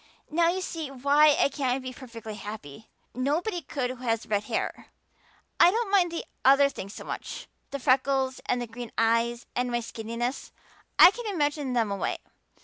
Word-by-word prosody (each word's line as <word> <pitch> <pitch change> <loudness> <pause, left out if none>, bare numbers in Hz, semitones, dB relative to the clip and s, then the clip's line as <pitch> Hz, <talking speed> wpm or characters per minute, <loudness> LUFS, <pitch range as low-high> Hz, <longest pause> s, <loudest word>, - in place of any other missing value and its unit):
"Now 335 +2 +3
you 370 +2 -1
see 325 -5 -4
why 285 +3 +4
I - - +5
can't 265 -2 -1
be 255 0 -6
perfectly 230 -4 -9
happy. 205 -4 -9 0.2
Nobody 330 - -1
could 255 -6 -3
who - - -6
has 230 -2 -1
red 205 -1 -1
hair. - - -3 0.7
I 340 - +8
don't 445 +1 -1
mind 365 -4 +4
the 335 - -4 0.2
other 275 +1 +6
things 200 -6 -8
so - - -8
much - - -6 0.2
the 280 - -4
freckles 265 0 +1
and 245 - +1
the 240 - -3
green 235 +1 -8
eyes 230 +1 +1
and 250 0 0
my 240 0 0
skinniness. 230 +3 -4 0.5
I 350 - +10
can 475 +2 -7
imagine 290 -6 -1
them 225 -4 +1
away. 200 - -1
260 Hz, 175 wpm, -27 LUFS, 230-295 Hz, 0.7 s, I